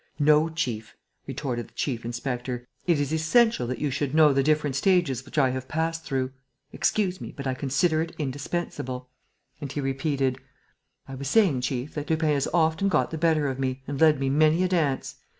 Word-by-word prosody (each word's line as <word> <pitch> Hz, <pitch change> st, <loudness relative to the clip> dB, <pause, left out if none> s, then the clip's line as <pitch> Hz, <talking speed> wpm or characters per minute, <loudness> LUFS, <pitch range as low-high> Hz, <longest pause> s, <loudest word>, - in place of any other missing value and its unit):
"No, 150 Hz, +1 st, +4 dB
chief," 125 Hz, -10 st, -3 dB, 0.3 s
retorted 120 Hz, -5 st, -3 dB
the -, -, -27 dB
chief 120 Hz, -5 st, -2 dB
inspector, 125 Hz, +1 st, -4 dB, 0.2 s
"it 170 Hz, -4 st, +3 dB
is 145 Hz, +1 st, -1 dB
essential 165 Hz, -, +3 dB
that 125 Hz, 0 st, -3 dB
you 145 Hz, +1 st, -1 dB
should 140 Hz, +1 st, -2 dB
know 155 Hz, -2 st, +6 dB
the 135 Hz, -, +3 dB
different 150 Hz, -1 st, +1 dB
stages 155 Hz, -5 st, +2 dB
which 140 Hz, +3 st, -11 dB
I 135 Hz, -3 st, +4 dB
have 130 Hz, 0 st, -5 dB
passed 165 Hz, +1 st, -2 dB
through. 130 Hz, -2 st, -1 dB, 0.4 s
Excuse 185 Hz, -4 st, 0 dB
me, -, -, -6 dB
but 140 Hz, -, -8 dB
I 130 Hz, -, 0 dB
consider 155 Hz, +5 st, +1 dB
it 165 Hz, +1 st, -5 dB
indispensable." 130 Hz, -3 st, -4 dB, 0.5 s
And 140 Hz, -3 st, -5 dB
he 145 Hz, -, -3 dB
repeated: 135 Hz, -1 st, -1 dB, 0.7 s
"I 135 Hz, -, -8 dB
was 135 Hz, +1 st, -5 dB
saying, 170 Hz, -, +3 dB
chief, 125 Hz, +2 st, -3 dB
that 150 Hz, -1 st, -5 dB
Lupin 160 Hz, -1 st, +1 dB
has 140 Hz, -2 st, +1 dB
often 160 Hz, +2 st, +2 dB
got 150 Hz, -8 st, +1 dB
the 160 Hz, -, -4 dB
better 160 Hz, -3 st, +2 dB
of 135 Hz, -1 st, -3 dB
me 130 Hz, 0 st, -2 dB
and 140 Hz, 0 st, -4 dB
led 155 Hz, -3 st, +5 dB
me 135 Hz, 0 st, 0 dB
many 155 Hz, +4 st, +4 dB
a -, -, +3 dB
dance. 160 Hz, -7 st, 0 dB
145 Hz, 195 wpm, -26 LUFS, 130-160 Hz, 0.7 s, know